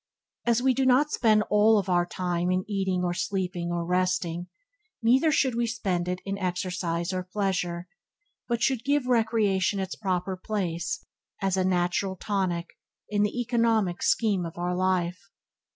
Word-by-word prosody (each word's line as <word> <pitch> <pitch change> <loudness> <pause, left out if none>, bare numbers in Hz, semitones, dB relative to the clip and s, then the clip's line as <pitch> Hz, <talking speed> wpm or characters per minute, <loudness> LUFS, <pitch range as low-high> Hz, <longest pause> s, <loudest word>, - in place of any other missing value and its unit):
As 235 +1 +3
we 260 -1 +4
do 265 - 0
not 260 +4 +4
spend 215 -2 +3
all 210 0 +5
our 175 -1 +2
time 175 -1 -1
in 185 0 0
eating 190 -3 -1
or 175 -1 0
sleeping 180 -2 -2
or 170 -1 -1
resting, 180 -1 0 0.6
neither 260 +7 +4
should 265 -4 +2
we 235 0 0
spend 190 -6 -1
it 180 0 -2
in 200 0 -3
exercise 180 -1 -2
or 185 - -1
pleasure, 180 -2 -2 0.6
but 235 -1 -1
should 260 -4 +1
give 285 -1 +1
recreation 220 -5 +2
its 190 -1 -3
proper 185 -2 -2
place 190 - -3 0.3
as 195 -2 0
a 190 - +1
natural 185 +1 0
tonic 185 -3 -2 0.3
in 205 -1 +1
the 210 +4 0
economic 225 -6 +1
scheme 205 -5 +2
of 165 0 -7
our 175 +1 -1
life. 185 -1 0
190 Hz, 155 wpm, -27 LUFS, 180-220 Hz, 0.6 s, all